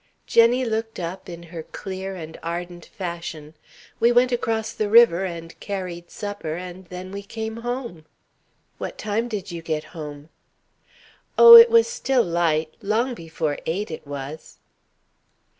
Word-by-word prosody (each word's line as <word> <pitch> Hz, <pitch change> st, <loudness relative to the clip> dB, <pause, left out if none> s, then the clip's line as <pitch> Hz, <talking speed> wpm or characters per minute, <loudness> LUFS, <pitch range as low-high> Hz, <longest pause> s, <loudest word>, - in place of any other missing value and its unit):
Jenny 240 Hz, +2 st, +4 dB
looked 225 Hz, 0 st, -3 dB
up 175 Hz, +2 st, -6 dB
in 170 Hz, -1 st, -8 dB
her 165 Hz, -, -5 dB
clear 190 Hz, +3 st, -6 dB
and 160 Hz, -2 st, -9 dB
ardent 175 Hz, +1 st, -5 dB
fashion: 170 Hz, -5 st, -6 dB, 0.5 s
"We 235 Hz, +1 st, +4 dB
went 245 Hz, +1 st, +4 dB
across 225 Hz, -2 st, -1 dB
the 215 Hz, -1 st, -2 dB
river 210 Hz, -5 st, +6 dB
and 165 Hz, -2 st, -7 dB
carried 180 Hz, -4 st, -5 dB
supper 205 Hz, -7 st, -5 dB
and 180 Hz, +1 st, -8 dB
then 180 Hz, +1 st, -8 dB
we 200 Hz, 0 st, -5 dB
came 220 Hz, +2 st, -6 dB
home." 235 Hz, -9 st, -5 dB, 0.7 s
"What -, -, -5 dB
time 220 Hz, +3 st, -1 dB
did 205 Hz, -5 st, -5 dB
you 170 Hz, -1 st, -6 dB
get 155 Hz, -2 st, -2 dB
home?" 150 Hz, -2 st, -8 dB, 1.1 s
"Oh, 470 Hz, 0 st, +11 dB
it 465 Hz, 0 st, +11 dB
was 460 Hz, 0 st, +6 dB
still 270 Hz, -, +1 dB
light. 165 Hz, -2 st, 0 dB
Long 225 Hz, +5 st, 0 dB
before 160 Hz, -6 st, -3 dB
eight, 185 Hz, +4 st, -2 dB
it 155 Hz, -, -8 dB
was." 145 Hz, +2 st, -8 dB
185 Hz, 145 wpm, -23 LUFS, 165-225 Hz, 1.1 s, Oh